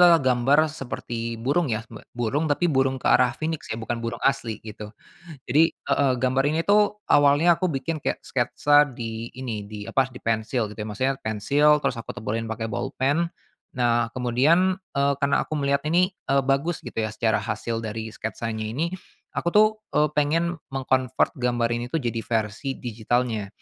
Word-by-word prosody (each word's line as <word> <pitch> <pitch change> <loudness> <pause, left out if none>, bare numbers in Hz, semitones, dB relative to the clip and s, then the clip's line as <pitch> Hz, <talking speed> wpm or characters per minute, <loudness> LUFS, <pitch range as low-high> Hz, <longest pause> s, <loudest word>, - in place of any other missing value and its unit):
adalah 175 -1 +8
gambar 130 +3 +3
seperti 115 -5 -5
burung 140 +7 0
ya, 110 0 -2
b 110 - -9 0.2
burung 135 +7 0
tapi 145 +4 +1
burung 135 -4 +2
ke - - -12
arah 125 -1 +4
phoenix 160 0 -4
ya - - -3
bukan 115 +1 -4
burung 115 0 -4
asli 125 -5 +1
gitu. 105 -1 -8 0.6
Jadi 155 +6 +4
heeh, 140 -2 +1
gambar 130 +1 +2
ini 165 - +1
tuh 210 +2 +2
awalnya 145 +4 +5
aku 185 - -1
bikin 155 0 -2
kayak - - -3
sketsa 145 0 +3
di 115 -3 -6
ini, 115 -5 -5
di 105 0 -8
apa, 130 -1 +1
di 125 - -11
pensil 115 0 -1
gitu 105 - -12
maksudnya 130 +6 -1
pensil 145 +8 +3
terus 120 - -1
aku 115 - -6
tebelin 115 -1 -3
pakai 110 0 -4
bolpen. 140 +10 0 0.5
Nah 120 -1 +1
kemudian, 150 - +2 0.2
eee, 140 0 +2
karena 140 0 +2
aku 155 - -3
melihat 140 0 +1
ini, 180 +3 +3 0.2
eee, 135 0 +3
bagus 140 +5 0
gitu - - -3
ya 110 - -1
secara 110 0 0
hasil 115 -1 -3
dari 110 0 -5
sketsanya 110 0 -4
ini 160 +10 -2 0.4
aku - - -3
tuh, 215 +1 +8 0.3
eee, 150 0 +3
pengen 160 +3 0 0.2
meng-convert 130 -1 +1
gambar 120 -1 +1
ini 120 +1 -2
tuh 125 - -5
jadi 115 -1 -1
versi 115 +4 -2
digitalnya. 115 -2 -1
130 Hz, 175 wpm, -24 LUFS, 115-145 Hz, 0.6 s, adalah